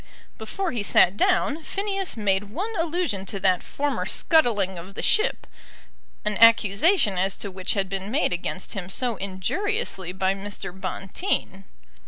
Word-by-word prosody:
Before 350 - -3
he 240 -4 -2
sat 195 -1 +4
down, 330 - +2
Phineas 390 - -3
made 200 -2 +1
one 395 - -4
allusion 330 - -1
to 195 - -4
that 185 -2 +3
former 290 0 -2
scuttling 210 - +2
of 190 +3 -11
the - - -3
ship, 435 +3 +1 0.8
an 210 0 0
accusation 230 - +5
as 190 +1 0
to 200 - -5
which 185 +2 -3
had 195 -1 0
been 195 +1 -4
made 265 - +1
against 175 +1 -4
him 185 -3 -5
so 240 +3 -1
injuriously 195 - -2
by 190 +1 0
Mr. 195 -2 -6
Bonteen. 195 - -3
205 Hz, 150 wpm, -24 LUFS, -, 0.8 s, accusation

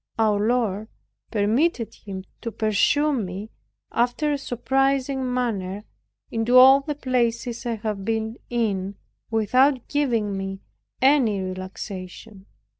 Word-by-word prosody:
Our 215 -2 +3
Lord 220 -2 0 0.4
permitted 230 +5 +1
him 190 -2 -8 0.2
to 230 - -4
pursue 225 +9 +2
me, 205 -3 -4 0.4
after 250 +6 +1
a - - 0
surprising 265 +1 0
manner, 210 -6 -2 0.5
into 230 +2 +3
all 265 +2 +9
the 295 +1 -4
places 240 -3 -1
I 235 - 0
have 210 -2 -4
been 220 +2 -2
in, 200 -5 -1 0.3
without 250 +4 +2
giving 235 -9 0
me 195 0 -5 0.4
any 260 -7 +4
relaxation. 185 +2 -7
225 Hz, 115 wpm, -24 LUFS, 205-255 Hz, 0.5 s, all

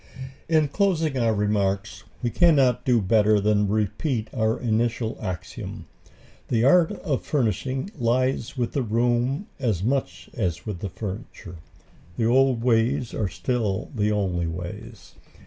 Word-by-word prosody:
In 155 -2 +3
closing 165 -3 +1
our 115 -2 +2
remarks 100 -1 -1 0.2
we 120 - 0
cannot 135 -8 +3
do 125 -2 +4
better 105 +1 +4
than 105 0 +2
repeat 110 - -1
our 110 -1 0
initial 115 0 0
axiom 90 -5 -6 0.6
the 115 -2 +1
art 165 +6 +5
of 155 -9 -2
furnishing 130 - -1
lies 130 0 0
with 120 -2 -1
the 140 - -1
room 120 - 0
as 110 -9 0
much 135 +4 -1
as 85 -1 -2
with 105 -5 -4
the 100 - -4
furniture. 95 -3 -7 0.6
The 115 - +1
old 125 0 +3
ways 120 +1 +1
are 105 -4 -1
still 100 +1 -2
the 105 -3 +1
only 90 -5 0
ways. 85 +2 -8
115 Hz, 135 wpm, -24 LUFS, 105-130 Hz, 0.6 s, art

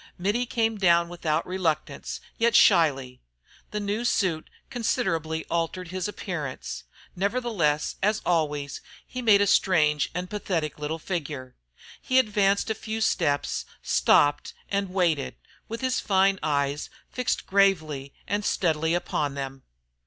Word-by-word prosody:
Mittie 205 +7 0
came 225 -2 0
down 170 -2 +4
without 165 -2 -1
reluctance, 180 -4 -2 0.2
yet 235 +1 +3
shyly. 135 -9 +4 0.5
The 210 - -3
new 205 +3 -2
suit 185 -9 0 0.2
considerably 165 - -1
altered 170 +1 -2
his 185 +1 -2
appearance: 170 -10 -5 0.3
nevertheless, 195 -8 0
as 210 +2 +2
always, 150 -5 0 0.2
he 255 - -6
made 210 -4 +5
a - - +4
strange 155 -7 +3
and 180 0 -2
pathetic 180 -7 -3
little 150 +2 -3
figure. 150 -7 -5 0.5
He 255 - +1
advanced 205 -3 +2
a - - +2
few 220 0 -5
steps, 155 -10 +1 0.2
stopped 145 0 +3
and 200 -1 -1
waited, 170 -7 0 0.3
with 230 +2 -5
his 260 -1 +1
fine 195 -1 +2
eyes 145 -1 -1 0.2
fixed 250 -1 -1
gravely 160 -9 +2 0.2
and 205 +2 -1
steadily 160 -3 +1
upon 150 -5 -1
them. 135 -1 -5
180 Hz, 130 wpm, -26 LUFS, 150-205 Hz, 0.5 s, made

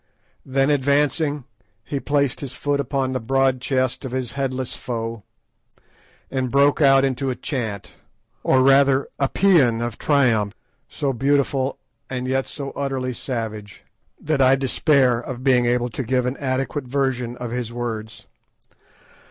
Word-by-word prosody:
Then 135 +2 +1
advancing, 145 +1 +1 0.4
he 140 - -3
placed 140 -1 0
his 135 -3 -5
foot 145 +1 -1
upon 135 -1 -1
the 130 - -1
broad 135 +1 +1
chest 130 0 -1
of 130 -2 -6
his 130 -2 -2
headless 130 -2 -3
foe 115 -2 -5 1.1
and 130 -2 -1
broke 140 +4 +3
out 135 -1 +6
into 135 0 -1
a 125 - -2
chant, 110 - -4 0.5
or 130 -1 +3
rather 135 0 +4
a 135 -1 +1
pæan 150 -13 +4
of 120 -2 -6
triumph, 115 -8 +2 0.3
so 140 -3 -2
beautiful, 135 +1 +1 0.3
and 125 -1 -3
yet 135 0 0
so 140 -2 -6
utterly 135 -2 -3
savage, 110 - -5 0.4
that 150 -3 0
I 130 0 +6
despair 135 -2 +2
of 125 +1 -7
being 125 -3 +3
able 120 0 0
to - - -4
give 125 +1 0
an 125 +1 -1
adequate 135 +1 -2
version 125 -2 -1
of 120 -2 -5
his 120 -1 -3
words. 115 -2 -5
130 Hz, 145 wpm, -22 LUFS, 120-140 Hz, 1.1 s, out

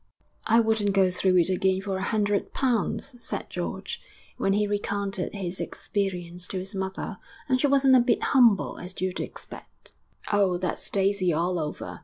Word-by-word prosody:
VIII - - -42
'I 230 +1 +5
wouldn't 220 -3 +1
go 190 -2 +4
through 185 0 +2
it 175 0 +4
again 190 0 +2
for 195 -1 -3
a - - -4
hundred 205 0 0
pounds,' 245 0 -1
said - - -3
George, - - -4 0.3
when 195 - +1
he 210 +1 +2
recounted 200 -2 -2
his 185 -2 -3
experience 180 -3 -3
to 190 - -4
his 190 +2 -3
mother. 190 -1 -4 0.3
'And 255 -2 +2
she 290 - +4
wasn't 270 -1 +5
a - - +7
bit 240 - +2
humble, 235 -7 +4
as 180 +1 -8
you'd 185 0 -2
expect.' - - -10 0.4
'Oh! 195 -3 +3
that's 180 0 -3
Daisy 195 -2 +1
all 170 +3 0
over. 150 -1 -5
195 Hz, 175 wpm, -26 LUFS, 185-210 Hz, 0.4 s, a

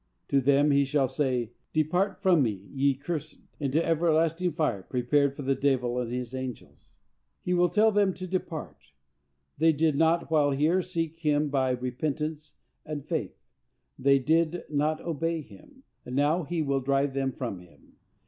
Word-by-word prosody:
To 140 - +3
them 140 +2 +4
he 140 0 +4
shall 140 -1 +1
say, 130 -4 -1 0.2
"Depart 180 +6 0
from 180 -5 +5
me, 100 -6 -2
ye 140 0 +2
cursed, 155 +2 -6 0.2
into 150 +3 0
everlasting 165 +1 +1
fire, 150 - 0
prepared 135 +6 +1
for 145 - -6
the 135 +1 +2
devil 125 -3 0
and 120 -2 -3
his 125 0 -4
angels." 130 -2 -8 0.5
He 180 - 0
will 175 0 +3
tell 215 +5 +4
them 205 -2 +3
to 185 - -6
depart; 175 -4 -4 0.8
they 160 +1 +5
did 155 0 +1
not, 165 +2 +2
while 150 -2 +4
here, 155 +7 +2
seek 165 -3 -3
him 150 -2 +1
by 135 -2 +1
repentance 145 +4 -3 0.3
and 150 -2 -6
faith; - - -3 0.6
they 140 +1 +4
did 165 +5 +1
not 150 +1 +1
obey 165 0 -2
him, 270 - -17 0.2
and 125 - -6
now 150 +4 +2
he 165 0 -1
will 140 -2 0
drive 135 +1 +1
them 135 -1 -1
from 120 -8 -5
him. 85 -5 -20
145 Hz, 165 wpm, -28 LUFS, 135-165 Hz, 0.8 s, from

